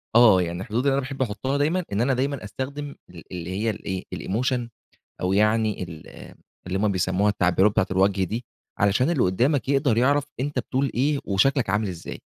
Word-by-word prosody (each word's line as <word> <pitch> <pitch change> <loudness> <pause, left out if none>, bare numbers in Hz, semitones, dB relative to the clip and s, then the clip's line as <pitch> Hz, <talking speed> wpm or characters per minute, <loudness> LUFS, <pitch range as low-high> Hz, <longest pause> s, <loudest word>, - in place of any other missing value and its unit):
آه 110 -6 +7
يعني، 85 +1 -3
الحدود 115 +3 -2
اللي 140 - +3
أنا 140 - +2
باحب 135 0 -6
أحُطَّها 130 +4 -1
دايمًا، 160 +6 +1
إن 100 +2 0
أنا 135 +2 +2
دايمًا 135 0 -1
أستخدم 140 +7 -5
ال 85 -2 -12
اللي 90 -1 -5
هي 105 +5 -1
الإيه 95 -3 -4
الemotion 120 +3 -1 0.5
أو 90 +1 0
يعني 110 0 +2
ال 80 -3 -9 0.6
اللي 95 +1 -2
هُم 105 -1 +1
بيسمُّوها 95 +3 +1
التعبيرات 95 +1 +3
بتاعة 95 - +2
الوجه 95 0 +2
دي، 115 +6 -4 0.3
علشان 105 +9 +3
اللي 150 -7 +2
قُدَّامك 125 +10 +1
يقدَر 135 -4 +2
يعرَف 140 +3 +3 0.2
أنتَ 145 0 -2
بتقول 130 +3 -1
إيه 140 +4 +1
وشكلَك 120 +4 +2
عامِل 105 +1 +1
إزاي. 85 -2 -7
110 Hz, 185 wpm, -24 LUFS, 95-135 Hz, 0.6 s, آه